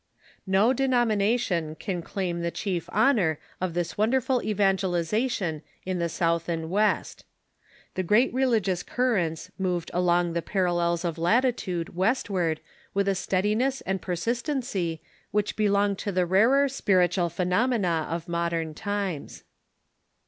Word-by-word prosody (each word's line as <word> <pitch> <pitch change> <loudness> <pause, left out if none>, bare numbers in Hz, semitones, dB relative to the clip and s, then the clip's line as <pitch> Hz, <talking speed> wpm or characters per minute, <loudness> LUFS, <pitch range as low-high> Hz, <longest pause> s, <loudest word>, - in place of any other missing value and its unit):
No 200 +6 +4
denomination 225 -9 +1
can 180 +1 -4
claim 175 -1 -3
the 170 - 0
chief 175 -2 -3
honor 210 - +3 0.2
of 180 -2 -2
this 175 +2 -2
wonderful 250 +3 +2
evangelization 195 - 0 0.2
in 185 -1 -2
the 170 0 0
South 165 0 0
and 165 -1 -3
West. 210 +2 0 0.7
The 185 - -1
great 210 +9 +3
religious 225 -9 +1
currents 185 -9 -1
moved 180 -3 -1
along 175 -1 +2
the 170 - 0
parallels 175 -2 0
of 165 -1 -2
latitude 185 -4 0
westward 185 -5 0 0.3
with 200 0 +1
a 195 - +3
steadiness 210 +8 0
and 190 0 -2
per 180 - -2
sistency 230 - -2 0.3
which 210 0 -1
belong 200 -1 +2
to 205 - -3
the 180 -1 +1
rarer 230 +10 +4
spiritual 180 -8 +2
phenomena 180 -1 +1
of 165 +2 -4
modern 170 -2 -1
times. 200 -4 -4
190 Hz, 125 wpm, -26 LUFS, 170-215 Hz, 0.7 s, No